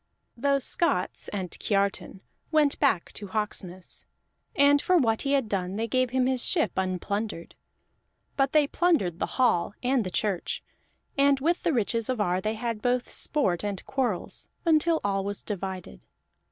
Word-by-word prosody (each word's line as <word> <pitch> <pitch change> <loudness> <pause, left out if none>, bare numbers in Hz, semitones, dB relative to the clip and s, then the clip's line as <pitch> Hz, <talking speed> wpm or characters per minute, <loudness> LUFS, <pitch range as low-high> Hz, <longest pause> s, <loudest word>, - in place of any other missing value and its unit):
Those 275 +2 +1
Scots 185 - 0
and 185 -4 -4
Kiartan 200 -2 -1 0.3
went 305 -3 +3
back 225 - +2
to 205 - -6
Hawksness, 190 -3 -4 0.5
and 285 0 +5
for 365 - +3
what 225 -7 +2
he 280 0 0
had 270 -5 +2
done 190 -2 -2
they 225 +2 -1
gave 255 +2 +1
him 255 +1 +1
his 255 -1 0
ship 325 -4 +1
unplundered. 190 0 -2 0.8
But 270 -1 +2
they 305 -1 +5
plundered 280 - +1
the - - 0
hall 220 -7 +2
and 250 -1 +2
the 185 - -4
church, 190 -1 -1 0.6
and 280 -1 +5
with 335 +5 +1
the 340 - +1
riches 230 -2 0
of 255 -3 -1
Ar 180 -2 +1
they 215 +3 -1
had 230 -1 -3
both 245 +1 0
sport 195 - +1
and 200 -2 -3
quarrels, 245 -9 -2 0.2
until 325 0 +3
all 195 -1 0
was 200 +1 -4
divided. 185 - -5
225 Hz, 160 wpm, -27 LUFS, 195-275 Hz, 0.8 s, and